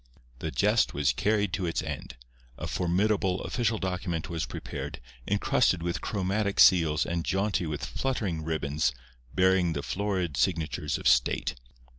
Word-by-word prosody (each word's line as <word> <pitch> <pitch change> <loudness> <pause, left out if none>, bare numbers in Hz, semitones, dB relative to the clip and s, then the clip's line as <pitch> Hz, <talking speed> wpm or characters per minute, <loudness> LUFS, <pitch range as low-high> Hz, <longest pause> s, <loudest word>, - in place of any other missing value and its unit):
The 80 - -3
jest 105 +7 +2
was 70 -1 +2
carried 105 -3 +1
to 90 -1 -1
its 85 - -1
end. - - -6 0.4
A - - -5
formidable, 95 +1 +1
official 115 -3 0
document 90 -4 -3
was 85 -1 -2
prepared, 70 0 -6 0.3
encrusted 100 -3 +2
with 85 0 -2
chromatic 100 +1 -1
seals 80 -4 +6
and 85 0 -2
jaunty 95 -2 0
with 75 -2 -3
fluttering 100 -12 -2
ribbons, 75 -4 0 0.4
bearing 95 -2 +3
the 70 -2 -3
florid 95 -6 -2
signatures 80 -3 0
of - - -2
state. 65 -1 +3
90 Hz, 140 wpm, -28 LUFS, 80-100 Hz, 0.4 s, seals